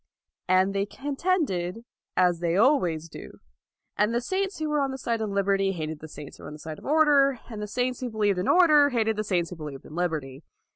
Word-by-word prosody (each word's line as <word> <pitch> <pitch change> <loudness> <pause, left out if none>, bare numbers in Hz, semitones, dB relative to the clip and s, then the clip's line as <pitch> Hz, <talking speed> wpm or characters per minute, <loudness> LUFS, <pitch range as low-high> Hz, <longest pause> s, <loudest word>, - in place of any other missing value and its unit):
And 185 +1 +3
they 200 0 -1
contended, 270 - -2 0.3
as 180 -2 +3
they 170 +1 0
always 180 - +2
do. - - -11 0.6
And 210 +3 +1
the - - +3
saints 380 +8 -2
who 310 -1 -2
were 300 -1 +1
on 275 - 0
the 265 - -5
side 235 -3 -2
of 215 - -2
liberty 195 -1 +1
hated 155 -3 -5
the 155 - -9
saints 150 -2 -10
who - - -15
were - - -8
on - - -8
the - - -9
side 155 0 -8
of - - -15
order; 285 -3 +4
and 215 -2 -6
the 210 - -4
saints 250 +3 -1
who 250 - -3
believed 205 -4 +1
in 180 - -2
order 305 -5 +6
hated 225 -4 +1
the 215 - -2
saints 180 -4 -1
who 180 - -7
believed 150 -4 -8
in - - -12
liberty. 155 -6 -3
205 Hz, 230 wpm, -26 LUFS, 175-270 Hz, 0.6 s, order